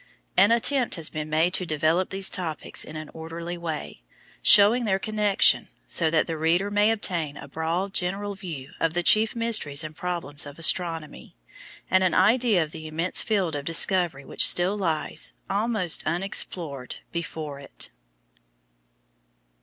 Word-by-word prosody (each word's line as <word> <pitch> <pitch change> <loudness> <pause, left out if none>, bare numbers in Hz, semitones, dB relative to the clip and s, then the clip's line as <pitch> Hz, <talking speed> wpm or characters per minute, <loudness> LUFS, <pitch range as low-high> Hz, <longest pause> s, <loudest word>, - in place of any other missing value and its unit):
An 200 +4 +5
attempt 245 +2 +2
has 165 -3 -2
been 155 -1 -5
made 160 +4 +1
to 185 - 0
develop 160 +2 0
these 195 0 +2
topics 160 -5 -1
in 155 - -9
an 155 -1 -7
orderly 165 +2 -7
way, 160 - -6 0.4
showing 220 +4 +7
their 190 -3 +1
connection, 210 -1 +2 0.2
so 165 -2 +3
that 155 0 +2
the 160 -1 -5
reader 175 +6 +1
may 205 +1 +3
obtain 170 -9 -1
a - - -10
broad 165 +6 -3
general 200 +2 -2
view 165 -8 -8
of 165 0 -1
the 175 - 0
chief 215 +5 +4
mysteries 220 -11 +2
and 155 0 -8
problems 165 -5 -3
of 145 - -11
astronomy, 165 -1 -1 0.5
and 185 0 +3
an 185 - +1
idea 215 -1 +3
of 155 - -9
the 155 -1 -9
immense 165 +4 +1
field 190 -8 -1
of 145 - -4
discovery 165 -2 +1
which - - +3
still 180 +3 +3
lies, 165 -6 -2 0.2
almost 205 -4 0
unexplored, 165 - -2 0.2
before 155 -4 -6
it. 140 - -6
170 Hz, 155 wpm, -25 LUFS, 155-195 Hz, 0.5 s, showing